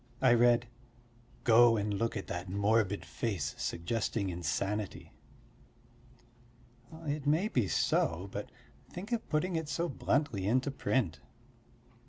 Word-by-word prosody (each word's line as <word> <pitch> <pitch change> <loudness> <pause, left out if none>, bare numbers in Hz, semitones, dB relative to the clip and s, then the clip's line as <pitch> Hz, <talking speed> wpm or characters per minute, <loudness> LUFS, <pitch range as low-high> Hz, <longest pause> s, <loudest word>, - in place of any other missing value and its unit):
I 130 -2 +5
read: 120 0 +4 0.8
"Go 115 0 +6
and 105 0 -1
look 115 +3 -1
at 100 - -4
that 90 0 -5
morbid 100 +1 +1
face 95 -11 -3
suggesting 100 +2 -2
insanity." 95 +5 -3 1.9
It 145 -1 -2
may 160 +8 +3
be 125 - +1
so, 85 +1 +1
but - - -6 0.4
think 195 +6 -8
of 235 -2 -2
putting 170 +3 0
it 160 -2 -2
so 170 +2 -1
bluntly 135 - 0
into 130 +5 +2
print. 110 - 0
115 Hz, 120 wpm, -32 LUFS, 100-140 Hz, 1.9 s, Go